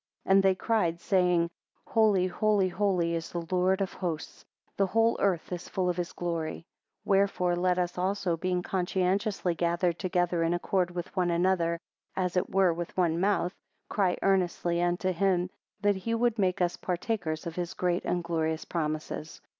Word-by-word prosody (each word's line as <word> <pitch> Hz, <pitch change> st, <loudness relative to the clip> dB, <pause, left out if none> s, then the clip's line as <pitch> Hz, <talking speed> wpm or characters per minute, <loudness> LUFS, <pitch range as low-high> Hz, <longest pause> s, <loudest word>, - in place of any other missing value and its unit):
And 195 Hz, +1 st, +5 dB
they 190 Hz, -1 st, +3 dB
cried, 185 Hz, -5 st, 0 dB
saying, 180 Hz, -3 st, +2 dB, 0.3 s
Holy, 210 Hz, -5 st, +3 dB
holy, 195 Hz, +1 st, +2 dB
holy 180 Hz, -3 st, +1 dB
is 165 Hz, -1 st, -3 dB
the 170 Hz, -1 st, -4 dB
Lord 185 Hz, +2 st, +2 dB
of 190 Hz, -, -2 dB
hosts; 170 Hz, -4 st, -5 dB, 0.3 s
The 195 Hz, -, +2 dB
whole 225 Hz, +4 st, +3 dB
earth 185 Hz, -4 st, 0 dB
is 180 Hz, -1 st, -5 dB
full 185 Hz, -1 st, 0 dB
of 175 Hz, -, -7 dB
his 175 Hz, -1 st, -2 dB
glory. 165 Hz, -2 st, -3 dB, 0.4 s
7 -, -, -13 dB
Wherefore 195 Hz, -2 st, +2 dB
let 180 Hz, 0 st, +1 dB
us 180 Hz, 0 st, -1 dB
also, 185 Hz, -2 st, 0 dB
being 180 Hz, +1 st, -1 dB
conscientiously 190 Hz, +1 st, 0 dB
gathered 170 Hz, +1 st, 0 dB
together 175 Hz, -2 st, 0 dB
in 165 Hz, +1 st, +2 dB
concord 180 Hz, +1 st, 0 dB
with 175 Hz, 0 st, -6 dB
one 180 Hz, -2 st, +1 dB
another; 170 Hz, -1 st, +2 dB, 0.4 s
as 180 Hz, -1 st, -1 dB
it 180 Hz, -, +1 dB
were 190 Hz, -3 st, +3 dB
with 170 Hz, +2 st, -6 dB
one 170 Hz, -2 st, +2 dB
mouth, 195 Hz, -1 st, +1 dB, 0.4 s
cry, 190 Hz, -4 st, +1 dB
earnestly 175 Hz, -2 st, +1 dB
unto 175 Hz, +2 st, +1 dB
him, 180 Hz, 0 st, +1 dB, 0.3 s
that 205 Hz, -1 st, +2 dB
he 230 Hz, +5 st, -2 dB
would 235 Hz, -1 st, +1 dB
make 185 Hz, -1 st, +1 dB
us 175 Hz, -1 st, +1 dB
partakers 180 Hz, -4 st, -2 dB
of 165 Hz, -1 st, -5 dB
his 175 Hz, -1 st, -3 dB
great 180 Hz, -1 st, 0 dB
and 175 Hz, -1 st, -1 dB
glorious 160 Hz, -1 st, -1 dB
promises. 155 Hz, -1 st, -4 dB
180 Hz, 170 wpm, -29 LUFS, 170-190 Hz, 0.4 s, And